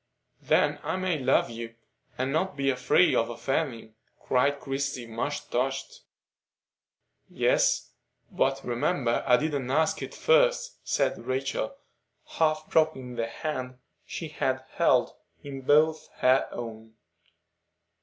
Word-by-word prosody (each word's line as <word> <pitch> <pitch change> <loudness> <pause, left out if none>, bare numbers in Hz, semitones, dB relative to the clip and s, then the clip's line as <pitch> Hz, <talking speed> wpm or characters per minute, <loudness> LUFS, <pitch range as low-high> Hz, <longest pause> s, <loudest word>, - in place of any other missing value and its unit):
"Then - - +2
I - - -2
may 185 -4 -1
love 130 -2 +2
you, 115 0 -7 0.4
and 130 +1 -1
not 160 0 -1
be 135 0 +2
afraid 125 +7 +3
of 115 - +2
offending?" 120 -2 -2 0.3
cried 140 +2 +1
Christie, 135 -2 -3
much 115 +6 -4
touched. 130 +2 -2 1.3
"Yes. - - +2 0.4
But 135 0 0
remember 120 0 0
I 125 - +6
didn't 140 -2 -2
ask 155 +4 +1
it - - -6
first," - - +2
said - - -1
Rachel, 135 - -2 0.6
half 155 -1 +2
dropping 145 -6 +1
the 115 -1 -2
hand 130 0 -5 0.3
she 165 - -6
had 130 -3 -1
held - - +3 0.3
in 135 -1 -7
both 155 +3 +3
her 130 +1 +3
own. 110 -1 -8
135 Hz, 120 wpm, -27 LUFS, 125-155 Hz, 1.3 s, I